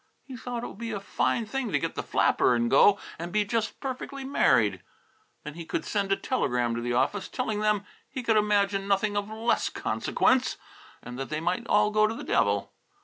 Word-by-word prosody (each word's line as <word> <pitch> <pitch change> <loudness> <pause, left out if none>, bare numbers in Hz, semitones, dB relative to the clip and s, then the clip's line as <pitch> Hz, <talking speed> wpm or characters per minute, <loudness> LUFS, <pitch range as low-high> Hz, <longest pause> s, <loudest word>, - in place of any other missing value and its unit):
He 265 - -9
thought 240 0 -5
it - - -3
would - - -12
be 230 -1 -4
a 210 -3 -3
fine 220 +3 0
thing 245 0 -3
to - - +3
get - - -2
the - - -3
flapper 125 - +2
and 120 0 0
go 200 +8 +6 0.2
and 170 +1 -5
be 210 +2 +1
just 220 +1 -2
perfectly 270 +1 -5
married. 130 - +2 0.6
Then 150 - -7
he 165 +2 -7
could 160 - -3
send 200 -2 -1
a - - +5
telegram 125 - 0
to 115 - -3
the 120 0 -2
office, 160 +11 0
telling 220 -5 -2
them 210 -1 +1 0.2
he 260 - -5
could 225 -1 +2
imagine 200 -2 +2
nothing 200 +1 +1
of 205 0 -2
less 225 +2 0
consequence, 255 0 +1 0.5
and 125 +1 -8
that 135 - -4
they 155 - -2
might 180 +8 -2
all 210 0 +3
go 215 0 +4
to 220 - -4
the - - -7
devil. 100 -1 +1
205 Hz, 210 wpm, -27 LUFS, 165-230 Hz, 0.6 s, go